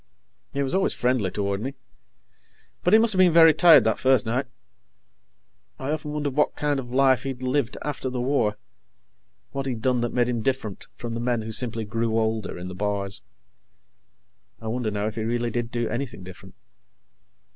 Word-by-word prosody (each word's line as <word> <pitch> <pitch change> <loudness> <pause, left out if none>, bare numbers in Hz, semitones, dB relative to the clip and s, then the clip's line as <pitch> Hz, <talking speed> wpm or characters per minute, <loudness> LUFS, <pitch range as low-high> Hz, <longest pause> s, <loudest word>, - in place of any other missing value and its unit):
He 140 - -1
was 135 - -3
always 190 +1 +1
friendly 125 -6 +1
toward 100 +1 -2
me, 135 +4 -4 1.1
but 180 - +2
he - - +10
must 225 -1 +4
have 185 - -1
been 185 -2 +6
very 165 -1 +7
tired 165 0 +7
that 110 - +1
first 130 -1 +3
night. 125 +4 -1 1.3
I 135 +2 -3
often 155 -1 -3
wondered 145 -3 -2
what 150 - +2
kind 145 -2 0
of 120 -2 -8
a - - -5
life 135 -1 +4
he'd 130 -2 -5
lived 130 -1 0
after 145 -3 -3
the 125 -1 -4
war 120 -5 +1 0.9
what 135 0 -3
he'd 120 -4 -4
done 125 -2 +2
that 120 - -1
made 120 -1 +1
him 120 -2 -1
different 120 -5 -3
from 120 -1 -6
the 115 - -3
men 120 -1 -1
who 110 - -6
simply 115 -1 -1
grew 115 +1 -1
older 110 -3 -1
in 90 +1 -6
the 90 - -7
bars. 100 0 -2 1.4
I 110 - -6
wonder, 120 -1 -1
now, 105 0 -2
if 110 - -2
he 110 - -4
really 120 +1 -1
did 120 0 -2
do 120 -1 -2
anything 120 -5 -4
different. 90 0 -12
120 Hz, 190 wpm, -25 LUFS, 110-135 Hz, 1.4 s, he